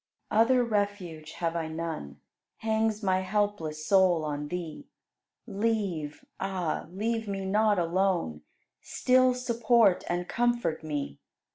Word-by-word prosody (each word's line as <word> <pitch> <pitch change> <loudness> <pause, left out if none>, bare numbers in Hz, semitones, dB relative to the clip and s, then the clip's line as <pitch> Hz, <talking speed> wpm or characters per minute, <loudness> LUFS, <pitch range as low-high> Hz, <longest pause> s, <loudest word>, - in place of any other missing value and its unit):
70. 220 - +5
Other 250 +2 +4
refuge 200 -8 -2
have 170 -1 -2
I 165 -1 -1
none; 160 - -5 0.4
Hangs 220 -1 0
my 185 -1 +2
helpless 185 -6 -1
soul 185 -4 +4
on 145 0 -3
Thee: 170 -1 -6 0.6
Leave, 195 -8 -2
ah! 185 -4 -2
leave 225 +4 -2
me 195 -1 -3
not 210 +1 +3
alone, 175 - 0 0.4
Still 255 0 +3
support 235 -5 +3
and 175 +1 -1
comfort 240 -10 0
me. 145 - -4
190 Hz, 120 wpm, -28 LUFS, 165-220 Hz, 0.6 s, 70